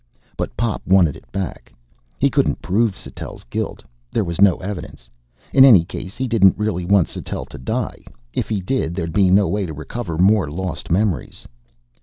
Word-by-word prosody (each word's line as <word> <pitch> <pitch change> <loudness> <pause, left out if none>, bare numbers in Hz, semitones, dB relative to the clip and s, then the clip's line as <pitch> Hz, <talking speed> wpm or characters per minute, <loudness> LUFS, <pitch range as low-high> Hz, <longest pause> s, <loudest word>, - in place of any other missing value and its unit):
But - - -4
Pop 115 -3 -1
wanted 90 -6 +4
it - - -16
back. 95 -10 -5 0.5
He - - +2
couldn't - - +1
prove 105 +1 +1
Sattell's - - -9
guilt. - - -4 0.3
There 110 - +1
was 85 0 -3
no 100 -3 +6
evidence. 95 0 -7 0.5
In 130 - +8
any 105 -11 +7
case, 95 +2 -8
he 130 - -1
didn't 100 -6 +4
really 105 -4 -1
want 100 -2 +4
Sattell - - -6
to - - -10
die. 65 - -3 0.3
If - - -2
he 105 -3 -1
did, 90 -4 -1
there'd 85 -3 -3
be 95 -1 +4
no 95 +2 +4
way 100 -2 -1
to 80 - -6
recover 80 +3 -5
more 95 -2 +3
lost 85 +1 -4
memories. 95 0 -1
95 Hz, 180 wpm, -20 LUFS, 85-105 Hz, 0.5 s, In